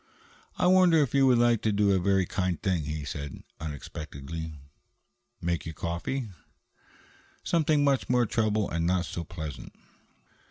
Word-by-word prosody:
"I -, -, +1 dB
wonder 180 Hz, -2 st, +6 dB
if 130 Hz, -, -4 dB
you 135 Hz, -1 st, +5 dB
would 125 Hz, -2 st, +5 dB
like 120 Hz, -1 st, +3 dB
to 110 Hz, -, +1 dB
do 100 Hz, -1 st, +3 dB
a 95 Hz, -, +3 dB
very 95 Hz, 0 st, +2 dB
kind 90 Hz, -2 st, -1 dB
thing," 90 Hz, -6 st, 0 dB
he 75 Hz, -1 st, -4 dB
said 70 Hz, -1 st, -6 dB, 0.2 s
unexpectedly. 80 Hz, +1 st, -6 dB, 0.8 s
"Make 85 Hz, -1 st, -2 dB
you 80 Hz, -, -6 dB
coffee?" 95 Hz, -, -3 dB, 1.1 s
"Something 155 Hz, -3 st, +2 dB
much 140 Hz, -2 st, +1 dB
more 125 Hz, -1 st, +3 dB
trouble 110 Hz, -2 st, +1 dB
and 85 Hz, 0 st, -1 dB
not 90 Hz, 0 st, +1 dB
so 85 Hz, -, -5 dB
pleasant." 80 Hz, -4 st, -7 dB
95 Hz, 150 wpm, -28 LUFS, 80-120 Hz, 1.1 s, wonder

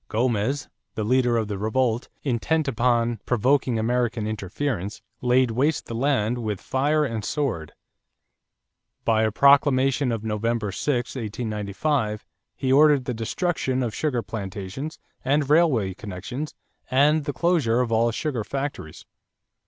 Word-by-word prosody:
Gomez, 120 Hz, +4 st, 0 dB, 0.3 s
the 110 Hz, -, -2 dB
leader 125 Hz, +1 st, +2 dB
of 110 Hz, -2 st, 0 dB
the 100 Hz, -2 st, -4 dB
revolt, 115 Hz, +2 st, 0 dB
intent 145 Hz, +4 st, 0 dB
upon 120 Hz, -2 st, +1 dB
provoking 125 Hz, +1 st, +2 dB
American 115 Hz, 0 st, 0 dB
interference, 105 Hz, 0 st, -3 dB, 0.2 s
laid 125 Hz, 0 st, +3 dB
waste 140 Hz, +7 st, +1 dB
the -, -, -7 dB
land 120 Hz, -2 st, +1 dB
with 105 Hz, -4 st, -3 dB
fire 150 Hz, +3 st, +1 dB
and 115 Hz, -5 st, -3 dB
sword. 115 Hz, -, -2 dB, 1.3 s
By 110 Hz, -1 st, +3 dB
a 110 Hz, -, +3 dB
proclamation 135 Hz, 0 st, +4 dB
of 115 Hz, -2 st, -3 dB
November 110 Hz, -1 st, -1 dB
6, 125 Hz, +5 st, -1 dB
1895, 110 Hz, +1 st, -2 dB, 0.3 s
he 130 Hz, -1 st, 0 dB
ordered 145 Hz, -2 st, +5 dB
the 125 Hz, -, -2 dB
destruction 130 Hz, -, -1 dB
of 115 Hz, -3 st, -2 dB
sugar 125 Hz, -7 st, -1 dB
plantations 105 Hz, +7 st, -6 dB, 0.3 s
and 140 Hz, +2 st, +2 dB
railway 145 Hz, -, +3 dB
connections 105 Hz, -, -6 dB, 0.3 s
and 145 Hz, +3 st, +3 dB
the 145 Hz, -, -1 dB
closure 140 Hz, -6 st, +2 dB
of 120 Hz, -2 st, -1 dB
all 115 Hz, +1 st, +3 dB
sugar 125 Hz, -1 st, -2 dB
factories. 135 Hz, -, -5 dB
120 Hz, 130 wpm, -24 LUFS, 110-140 Hz, 1.3 s, ordered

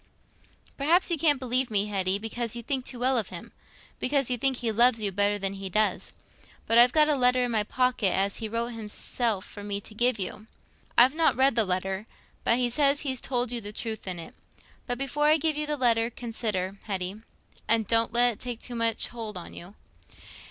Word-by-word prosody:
"Perhaps 335 Hz, +6 st, +3 dB
you 335 Hz, -, +2 dB
can't 295 Hz, -4 st, +3 dB
believe 255 Hz, 0 st, 0 dB
me, 205 Hz, -2 st, +1 dB
Hetty, 195 Hz, -2 st, 0 dB
because 225 Hz, +2 st, -3 dB
you 235 Hz, -, -6 dB
think 260 Hz, +1 st, -2 dB
too 250 Hz, -, -3 dB
well 255 Hz, 0 st, +2 dB
of 210 Hz, -, -4 dB
him—because 255 Hz, +8 st, -4 dB
you 245 Hz, -, +1 dB
think 270 Hz, 0 st, +1 dB
he 235 Hz, -2 st, -1 dB
loves 235 Hz, +2 st, +4 dB
you 205 Hz, -2 st, -1 dB
better 205 Hz, +2 st, +1 dB
than 195 Hz, -1 st, -2 dB
he 195 Hz, -1 st, -6 dB
does. 215 Hz, +3 st, 0 dB, 0.5 s
But 230 Hz, +1 st, +4 dB
I've 245 Hz, +1 st, +7 dB
got 305 Hz, +1 st, +4 dB
a 300 Hz, -, +3 dB
letter 250 Hz, -1 st, +3 dB
i' -, -, 0 dB
my 225 Hz, -3 st, +1 dB
pocket, 250 Hz, -3 st, 0 dB
as 195 Hz, +2 st, 0 dB
he 220 Hz, -2 st, -5 dB
wrote 230 Hz, +2 st, -2 dB
himself 220 Hz, -1 st, -2 dB
for 205 Hz, -, -10 dB
me 200 Hz, -1 st, -3 dB
to 215 Hz, -, -12 dB
give 240 Hz, +2 st, +2 dB
you. 205 Hz, +3 st, -5 dB, 0.5 s
I've 250 Hz, +3 st, +7 dB
not 320 Hz, 0 st, +2 dB
read 265 Hz, -1 st, +3 dB
the 225 Hz, -2 st, +3 dB
letter, 190 Hz, +3 st, -2 dB, 0.4 s
but 230 Hz, -, +3 dB
he 250 Hz, -1 st, +1 dB
says 280 Hz, +3 st, +3 dB
he's 265 Hz, -3 st, -1 dB
told 245 Hz, -2 st, -1 dB
you 240 Hz, -1 st, -2 dB
the 205 Hz, 0 st, -5 dB
truth 220 Hz, -1 st, -6 dB
in 185 Hz, -1 st, -3 dB
it. 165 Hz, -, -9 dB, 0.5 s
But 245 Hz, -1 st, -2 dB
before 280 Hz, +3 st, 0 dB
I 310 Hz, +1 st, +5 dB
give 315 Hz, 0 st, 0 dB
you 300 Hz, 0 st, -2 dB
the 300 Hz, 0 st, -1 dB
letter, 230 Hz, -3 st, +2 dB
consider, 215 Hz, -5 st, -3 dB
Hetty, 195 Hz, 0 st, -4 dB, 0.5 s
and 220 Hz, -2 st, +2 dB
don't 230 Hz, +1 st, +2 dB
let 240 Hz, +1 st, +4 dB
it -, -, -17 dB
take 245 Hz, -2 st, -6 dB
too 245 Hz, -, -6 dB
much 230 Hz, -1 st, 0 dB
hold 225 Hz, -4 st, -6 dB
on 175 Hz, -, -9 dB
you. 180 Hz, +4 st, -11 dB
230 Hz, 215 wpm, -27 LUFS, 205-255 Hz, 0.5 s, I've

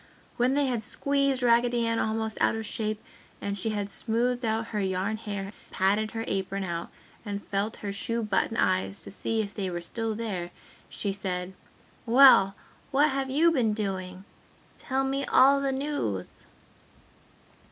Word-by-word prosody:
When 250 Hz, +2 st, +2 dB
they 285 Hz, 0 st, +3 dB
had 245 Hz, -4 st, -1 dB
squeezed 275 Hz, +2 st, 0 dB
Raggedy 240 Hz, 0 st, +3 dB
Ann 230 Hz, 0 st, 0 dB
almost 220 Hz, 0 st, -1 dB
out -, -, +3 dB
of 225 Hz, 0 st, -4 dB
shape 215 Hz, 0 st, -2 dB, 0.4 s
and 200 Hz, 0 st, -3 dB
she 200 Hz, +3 st, -2 dB
had 205 Hz, -2 st, -2 dB
smoothed 240 Hz, +4 st, 0 dB
out 225 Hz, 0 st, -1 dB
her 210 Hz, -, 0 dB
yarn 190 Hz, +2 st, -1 dB
hair, 200 Hz, -2 st, -5 dB, 0.2 s
patted 205 Hz, +3 st, +1 dB
her 225 Hz, 0 st, -4 dB
apron 195 Hz, 0 st, -2 dB
out 170 Hz, -2 st, -4 dB, 0.3 s
and 205 Hz, -2 st, -5 dB
felt 200 Hz, +2 st, -1 dB
her 200 Hz, -, -2 dB
shoe 230 Hz, +3 st, -2 dB
button 215 Hz, +2 st, 0 dB
eyes 95 Hz, +1 st, +1 dB
to 100 Hz, -, -8 dB
see 220 Hz, -, -1 dB
if 200 Hz, 0 st, -8 dB
they 195 Hz, -3 st, -3 dB
were 175 Hz, -1 st, -3 dB
still 225 Hz, +5 st, -3 dB
there, 200 Hz, -6 st, -3 dB, 0.4 s
she 200 Hz, -2 st, -3 dB
said, 185 Hz, -2 st, -4 dB, 0.5 s
"Well, 230 Hz, -6 st, +7 dB, 0.3 s
what 290 Hz, +2 st, +3 dB
have 270 Hz, 0 st, -2 dB
you 315 Hz, +5 st, +4 dB
been 240 Hz, -8 st, +2 dB
doing? 190 Hz, -2 st, -4 dB, 0.5 s
Tell 265 Hz, 0 st, -1 dB
me 270 Hz, +1 st, -1 dB
all 275 Hz, +1 st, +5 dB
the 275 Hz, -1 st, 0 dB
news!" 265 Hz, -, -3 dB
220 Hz, 165 wpm, -27 LUFS, 195-245 Hz, 0.5 s, Well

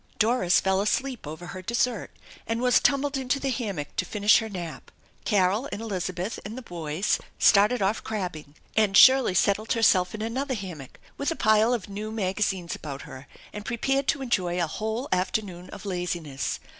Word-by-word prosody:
Doris 220 Hz, -5 st, +3 dB
fell 190 Hz, 0 st, +1 dB
asleep 250 Hz, -, -1 dB
over 160 Hz, +3 st, -7 dB
her 185 Hz, +1 st, -7 dB
dessert 235 Hz, +3 st, -1 dB, 0.4 s
and 230 Hz, 0 st, -1 dB
was 250 Hz, 0 st, +4 dB
tumbled 280 Hz, 0 st, +1 dB
into 265 Hz, +1 st, -1 dB
the 270 Hz, -1 st, -1 dB
hammock 200 Hz, -, -4 dB
to -, -, +2 dB
finish 205 Hz, +2 st, +4 dB
her 225 Hz, -1 st, -5 dB
nap. 175 Hz, -5 st, -7 dB, 0.4 s
Carol 205 Hz, +5 st, +2 dB
and -, -, -4 dB
Elizabeth 185 Hz, -2 st, -3 dB
and 215 Hz, +5 st, -7 dB
the 260 Hz, -, -7 dB
boys 170 Hz, 0 st, -1 dB, 0.2 s
started 210 Hz, +3 st, +4 dB
off 200 Hz, +3 st, 0 dB
crabbing, 175 Hz, -9 st, -5 dB, 0.2 s
and 210 Hz, -3 st, +3 dB
Shirley 260 Hz, -7 st, +7 dB
settled 200 Hz, +4 st, +2 dB
herself 190 Hz, -5 st, +3 dB
in 215 Hz, -, -5 dB
another 260 Hz, +4 st, -2 dB
hammock 175 Hz, -, -8 dB, 0.2 s
with 280 Hz, -, 0 dB
a 330 Hz, -, -1 dB
pile 215 Hz, 0 st, +4 dB
of 235 Hz, -6 st, -1 dB
rew 210 Hz, +2 st, -5 dB
magazines 195 Hz, -4 st, -1 dB
about 140 Hz, -2 st, -7 dB
her 130 Hz, +2 st, -11 dB, 0.3 s
and 210 Hz, -, -6 dB
pre 235 Hz, +2 st, -3 dB
pared 270 Hz, +2 st, 0 dB
to 275 Hz, -, +1 dB
enjoy 180 Hz, -8 st, 0 dB
a 170 Hz, -, +2 dB
whole 220 Hz, -, -3 dB
afternoon 185 Hz, -1 st, -2 dB
of 200 Hz, -, -10 dB
laziness. 175 Hz, -8 st, -3 dB
205 Hz, 180 wpm, -26 LUFS, 180-235 Hz, 0.4 s, Shirley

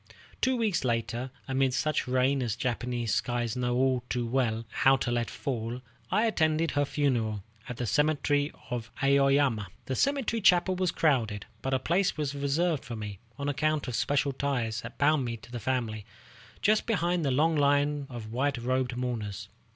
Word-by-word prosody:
Two 260 Hz, -1 st, +2 dB
weeks 215 Hz, -10 st, +1 dB
later, 120 Hz, +1 st, -1 dB, 0.2 s
amid 130 Hz, -1 st, +1 dB
such 155 Hz, -1 st, 0 dB
rain 130 Hz, +2 st, +2 dB
as 115 Hz, -4 st, -1 dB
Japanese 120 Hz, -2 st, -2 dB
skies 120 Hz, 0 st, -1 dB
know 125 Hz, -1 st, 0 dB
all 130 Hz, -1 st, +2 dB
too 120 Hz, -1 st, -1 dB
well 115 Hz, -2 st, 0 dB
how 135 Hz, +1 st, +4 dB
to 120 Hz, -, -2 dB
let 120 Hz, -1 st, 0 dB
fall, 120 Hz, -2 st, -3 dB, 0.3 s
I 215 Hz, +4 st, +2 dB
attended 160 Hz, -6 st, +2 dB
her 145 Hz, 0 st, +1 dB
funeral 120 Hz, -9 st, 0 dB, 0.3 s
at 125 Hz, -, -5 dB
the 125 Hz, -, -2 dB
cemetery 145 Hz, +2 st, +1 dB, 0.2 s
of 120 Hz, -2 st, -3 dB
Aoyama. 135 Hz, -5 st, +3 dB, 0.2 s
The 130 Hz, -, -2 dB
cemetery 270 Hz, -, +1 dB
chapel 185 Hz, -1 st, +4 dB
was 185 Hz, 0 st, +1 dB
crowded, 120 Hz, -12 st, +1 dB, 0.2 s
but 135 Hz, 0 st, 0 dB
a -, -, +4 dB
place 175 Hz, +9 st, +1 dB
was 145 Hz, -2 st, -1 dB
reserved 145 Hz, +3 st, 0 dB
for 120 Hz, -3 st, -6 dB
me, 105 Hz, -3 st, -6 dB, 0.2 s
on 140 Hz, -, -3 dB
account 155 Hz, +1 st, 0 dB
of 125 Hz, -, -3 dB
special 140 Hz, +4 st, +1 dB
ties 125 Hz, -5 st, -1 dB
that -, -, -9 dB
bound 150 Hz, -1 st, +3 dB
me 115 Hz, -1 st, -3 dB
to 115 Hz, -, -15 dB
the 120 Hz, -, -4 dB
family, 115 Hz, -3 st, -2 dB, 0.6 s
just 215 Hz, +1 st, +3 dB
behind 175 Hz, -5 st, +1 dB
the 140 Hz, -, +1 dB
long 155 Hz, +5 st, +3 dB
line 145 Hz, 0 st, +2 dB
of 115 Hz, -4 st, -7 dB
white 135 Hz, +2 st, 0 dB
robed 125 Hz, +1 st, -1 dB
mourners. 115 Hz, -6 st, -4 dB
130 Hz, 175 wpm, -29 LUFS, 120-150 Hz, 0.6 s, how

